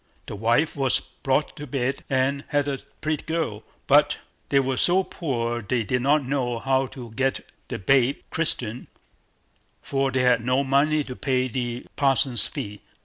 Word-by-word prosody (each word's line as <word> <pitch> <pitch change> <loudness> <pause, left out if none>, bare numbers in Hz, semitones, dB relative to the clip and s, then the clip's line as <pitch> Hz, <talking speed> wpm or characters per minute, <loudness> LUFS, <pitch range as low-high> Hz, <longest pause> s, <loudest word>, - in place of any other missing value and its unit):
The - - -6
wife 115 +9 +2
was 135 -3 +2
brought 135 +2 -2
to 150 -1 -7
bed, 135 0 -2
and 135 +1 +1
had 145 -1 +1
a 135 -2 -2 0.2
pretty 155 -1 -1
girl, 160 -10 -2 0.2
but - - +4 0.3
they 140 - +4
were 135 -1 0
so 185 +6 +4
poor 120 -9 -2
they 115 +3 -1
did 125 +3 0
not 140 +2 +3
know 125 -3 -1
how 130 +2 +1
to 120 -3 -10
get 135 +4 -1 0.2
the - - -4
babe 130 +6 +3
christened, 125 -8 0 1.0
for 135 0 0
they 130 -1 +1
had 125 -2 +3
no 130 +3 +2
money 145 +3 +2
to 130 -2 -7
pay 130 -1 0
the 120 -1 -3
parson's 135 -4 +2
fees. 105 0 -6
130 Hz, 165 wpm, -25 LUFS, 120-140 Hz, 1.0 s, but